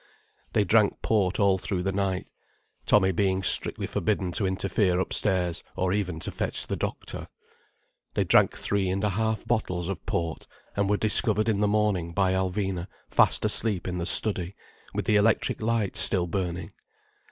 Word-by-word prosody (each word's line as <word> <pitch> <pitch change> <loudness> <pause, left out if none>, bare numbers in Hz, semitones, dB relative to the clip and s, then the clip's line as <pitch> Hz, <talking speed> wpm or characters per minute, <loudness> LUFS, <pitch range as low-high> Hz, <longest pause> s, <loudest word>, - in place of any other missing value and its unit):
They 105 - +3
drank 105 +1 +2
port 100 -4 +1
all 100 -2 +3
through 90 -1 -3
the 95 - 0
night, 95 -1 -2 0.6
Tommy 95 -2 +4
being 95 +1 0
strictly - - +3
forbidden 95 -4 -1
to 95 +2 -1
interfere 95 -1 0
upstairs, 90 -3 -1
or 90 0 0
even 90 -5 -2
to - - -4
fetch - - -2
the - - -3
doctor. - - -5 0.9
They - - +2
drank - - +3
three 100 -2 -1
and 95 +2 -2
a 105 - +2
half 110 +1 -1
bottles 90 -7 -2
of 95 - -5
port, 85 -1 -3 0.3
and 100 -1 0
were 105 - +2
discovered 110 0 +2
in 105 -3 +1
the 105 - +2
morning 100 -5 0
by 95 0 +1
Alvina 95 -1 -2 0.2
fast - - +3
asleep 105 -6 +2
in 90 0 -3
the 85 - -2
study, 95 -4 +2 0.4
with - - -3
the 105 - +3
electric 110 +2 +1
light 110 -3 -1
still 95 -1 +2
burning. 90 0 -4
95 Hz, 165 wpm, -26 LUFS, 90-105 Hz, 0.9 s, Tommy